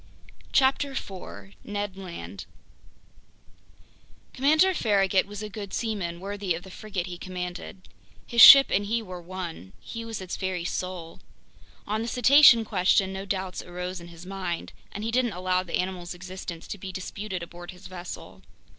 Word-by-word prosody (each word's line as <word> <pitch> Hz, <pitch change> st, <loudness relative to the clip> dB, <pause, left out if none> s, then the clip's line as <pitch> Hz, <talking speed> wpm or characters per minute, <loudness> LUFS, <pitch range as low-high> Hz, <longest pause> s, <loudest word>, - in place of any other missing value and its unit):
CHAPTER 270 Hz, 0 st, +2 dB
4 140 Hz, -, -7 dB
Ned 205 Hz, -2 st, -4 dB
Land 170 Hz, -, -8 dB, 1.9 s
COMMANDER 310 Hz, +8 st, +4 dB
FARRAGUT 195 Hz, -, +2 dB
was 205 Hz, +1 st, -7 dB
a -, -, -4 dB
good 205 Hz, -1 st, -6 dB
seaman, 195 Hz, -7 st, -3 dB
worthy 195 Hz, -2 st, -2 dB
of 170 Hz, -, -8 dB
the 190 Hz, -, -12 dB
frigate 195 Hz, -3 st, -4 dB
he 175 Hz, -1 st, -7 dB
commanded. 180 Hz, +1 st, -6 dB, 0.4 s
His 235 Hz, -1 st, +3 dB
ship 275 Hz, +4 st, +11 dB
and 205 Hz, +1 st, +1 dB
he 230 Hz, +2 st, 0 dB
were 180 Hz, -3 st, -8 dB
one. 170 Hz, -, -7 dB
He 230 Hz, 0 st, -7 dB
was 225 Hz, -1 st, -5 dB
its 185 Hz, -1 st, -5 dB
very 185 Hz, -3 st, -3 dB
soul. 175 Hz, -2 st, -4 dB, 0.7 s
On 215 Hz, +2 st, -1 dB
the 230 Hz, -, -3 dB
cetacean 245 Hz, -1 st, +7 dB
question 190 Hz, -1 st, +2 dB
no 190 Hz, +1 st, -5 dB
doubts 190 Hz, -2 st, -3 dB
arose 180 Hz, 0 st, -6 dB
in 170 Hz, -, -10 dB
his 170 Hz, 0 st, -12 dB
mind, 185 Hz, -3 st, -4 dB, 0.2 s
and 205 Hz, -, -6 dB
he 225 Hz, -, -1 dB
didn't 245 Hz, -2 st, +1 dB
allow 185 Hz, 0 st, 0 dB
the 180 Hz, -2 st, -2 dB
animal's 180 Hz, -1 st, -3 dB
existence 185 Hz, -2 st, -8 dB
to 205 Hz, -, -5 dB
be 190 Hz, 0 st, -6 dB
disputed 185 Hz, 0 st, -5 dB
aboard 175 Hz, +1 st, -10 dB
his 180 Hz, +1 st, -11 dB
vessel. 175 Hz, -, -9 dB
190 Hz, 160 wpm, -27 LUFS, 180-210 Hz, 1.9 s, ship